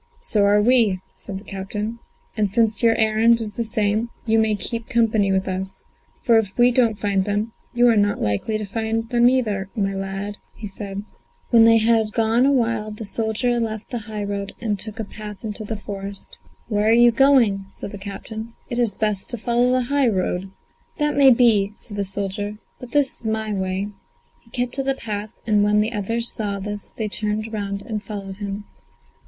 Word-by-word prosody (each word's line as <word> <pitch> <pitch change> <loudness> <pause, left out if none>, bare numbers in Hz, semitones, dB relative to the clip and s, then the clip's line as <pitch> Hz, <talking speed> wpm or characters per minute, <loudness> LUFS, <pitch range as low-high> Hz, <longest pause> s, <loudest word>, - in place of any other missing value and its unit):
"So 205 -2 +2
are 205 +1 +4
we," 225 -6 +4
said 195 - -7
the 195 - -10
captain, 210 +3 -5 0.4
"and 210 -3 +1
since 220 +2 +1
your 230 -1 +4
errand 220 +1 +4
is 215 -2 -5
the 235 - -1
same, 215 0 0 0.2
you 225 -1 +3
may 220 -1 +2
keep 230 +3 -4
company 220 -5 +2
with 190 +1 +1
us, 190 0 -4 0.4
for 230 -2 +5
if 200 -3 -4
we 245 0 +6
don't 235 -4 +2
find 200 -2 +1
them, 210 +3 -2 0.2
you 240 0 +5
are 235 - +5
not 205 -1 +2
likely 105 - 0
to 215 - -4
find 225 +2 -2
them 240 -1 +5
either, 210 -7 0
my 195 -3 0
lad," 195 +1 -4 0.3
said 195 0 -6
he. 200 - -4 0.5
When 230 -2 +7
they 230 0 +7
had 220 -1 +2
gone 230 +3 +3
awhile 230 -5 +1
the 215 +1 -7
soldier 225 +3 0
left 220 -2 -4
the 240 - -2
high 210 -1 -3
road, 200 0 -4
and 210 -4 -2
took 215 +2 -6
a - - -1
path 210 -1 -9
into 215 0 -5
the 215 +1 -4
forest. 200 -1 -7 0.3
"Where 210 -1 +1
are - - +6
you 240 +1 +7
going?" 235 -6 +4
said 195 - -8
the 205 - -8
captain; 220 +3 -7 0.2
"it 240 - -1
is 230 -5 +1
best 210 -3 -1
to 240 - -4
follow 240 +2 +2
the 255 0 +3
high 280 +1 +2
road." 185 -1 -1 0.5
"That 295 -1 0
may 275 -1 +7
be," 225 -5 +4
said 210 - -8
the 200 -1 -1
soldier, 205 +2 -3 0.2
"but 250 - -9
this 285 0 +2
is 225 - -6
my 220 -1 -1
way." 190 +1 -2 0.5
He - - -25
kept 245 +1 -2
to 270 - -2
the 270 0 0
path, 210 -3 -5 0.2
and 210 -2 +3
when 210 0 +3
the 215 +2 +1
others 230 +3 -1
saw 205 -4 -1
this 205 +1 -6
they 220 - -4
turned 215 +1 -2
round 200 -1 -3
and 215 -3 -4
followed 195 -2 -7
him. 205 0 -5
215 Hz, 200 wpm, -22 LUFS, 200-230 Hz, 0.5 s, When